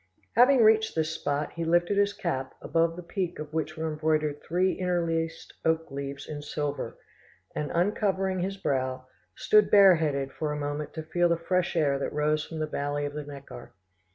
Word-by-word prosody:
Having 250 +1 +6
reached 220 0 +4
this 160 0 0
spot, 145 -2 -2
he 170 - -3
lifted 175 +4 +2
his 200 0 +3
cap, 135 -9 -3
above 165 0 +1
the 180 - -8
peak 180 0 -3
of 150 0 -7
which 155 0 -2
were 160 0 -2
embroidered 155 -1 0
three 180 +3 +1
interlaced 165 -3 -2
oak 160 -2 0
leaves 140 0 -6
in 150 -1 -6
silver, 145 -1 -4 0.6
and 150 - -2
uncovering 190 +1 +1
his 195 +2 -2
brow, 130 -7 -1 0.3
stood 210 -1 +4
bareheaded 160 -9 +5
for 155 -1 -2
a 150 - -3
moment 145 +1 -3
to 160 - -4
feel 175 +2 +1
the 170 - +2
fresh 180 +2 0
air 140 -4 +2
that - - -3
rose 150 +1 +1
from 165 - -8
the 155 - -1
valley 145 -1 -2
of 145 - -4
the 150 0 -4
Neckar. 140 -4 -10
160 Hz, 180 wpm, -28 LUFS, 145-180 Hz, 0.6 s, Having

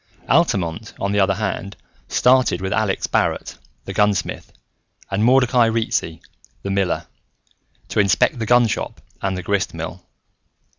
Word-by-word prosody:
Altamont, 105 - +1
on 100 - -1
the 105 - +1
other 95 0 +3
hand, 100 -1 -4 0.3
started 125 -7 +3
with 95 0 -2
Alex 110 -3 0
Barrett, - - -1 0.3
the - - -5
gunsmith, 105 -3 0 0.6
and 100 +2 0
Mordecai 125 -1 +4
Ricci, 110 -7 -1 0.4
the 100 - -3
miller, 95 -2 0 0.8
to - - -1
inspect 105 +6 +3
the 110 - -3
gunshop 120 -2 +2 0.2
and 95 -1 -1
the 90 - -5
grist 100 -2 -1
mill. 80 +2 -6
100 Hz, 135 wpm, -21 LUFS, 95-115 Hz, 0.8 s, Mordecai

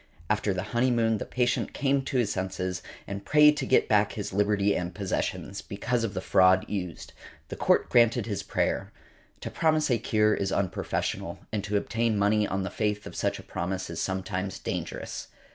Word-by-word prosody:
After 105 -1 +1
the 95 0 -2
honeymoon 120 -3 +2
the - - -5
patient 125 -1 0
came 140 0 +1
to 135 - -1
his 115 -5 +1
senses, 95 -1 -3 0.2
and 100 0 -6
prayed 150 0 +6
to - - -2
get 130 - +4
back 105 -1 +3
his 105 -3 -5
liberty 100 0 +2
and 90 0 -3
possessions, 100 0 -3
because 115 +4 -2
of 105 -3 -3
the 95 - -2
fraud 95 -1 +4
used. 90 -4 -5 0.4
The - - -5
Court - - +2
granted 120 -1 +4
his 105 -4 -3
prayer. - - -1 0.5
To - - -5
promise 155 -3 +2
a 120 - +3
cure 105 -1 +2
is 95 -2 -1
unprofessional, 95 -2 -2 0.2
and 105 -2 -1
to 105 0 0
obtain 115 +1 0
money 105 +1 +3
on 95 0 -2
the 95 - -4
faith 105 -1 -1
of - - -8
such - - 0
a - - -10
promise 95 +1 -4
is 85 - -4
sometimes 95 0 -3
dangerous. - - -5
105 Hz, 185 wpm, -27 LUFS, 95-115 Hz, 0.5 s, prayed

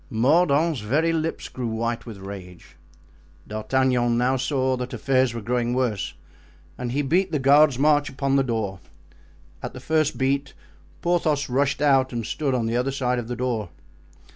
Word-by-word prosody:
Mordaunt's 150 +5 +3
very 150 +10 +1
lips 160 0 -2
grew 125 -2 -5
white 115 +1 -3
with 110 -3 -8
rage. 95 -4 -10 0.7
D'Artagnan 120 +2 +1
now 125 +2 +2
saw 130 0 0
that 125 0 -5
affairs 130 -3 +1
were 115 - -5
growing 120 +1 0
worse 120 -6 -1 0.6
and 125 -1 -4
he 145 +3 0
beat 180 +6 +1
the 155 - +1
guard's 140 0 +5
march 145 +1 +3
upon 135 0 -1
the 135 - +4
door. 110 -6 -2 0.8
At - - -6
the - - -8
first 155 -1 0
beat 140 +1 -1 0.5
Porthos 160 -5 +1
rushed 140 +3 +1
out 135 -2 +3
and 120 -2 -3
stood 140 +1 -1
on 120 -2 0
the 115 +1 -1
other 125 +2 +1
side 125 -2 -1
of 115 - -6
the 120 - -3
door. 120 -6 -2
130 Hz, 165 wpm, -24 LUFS, 120-145 Hz, 0.8 s, guard's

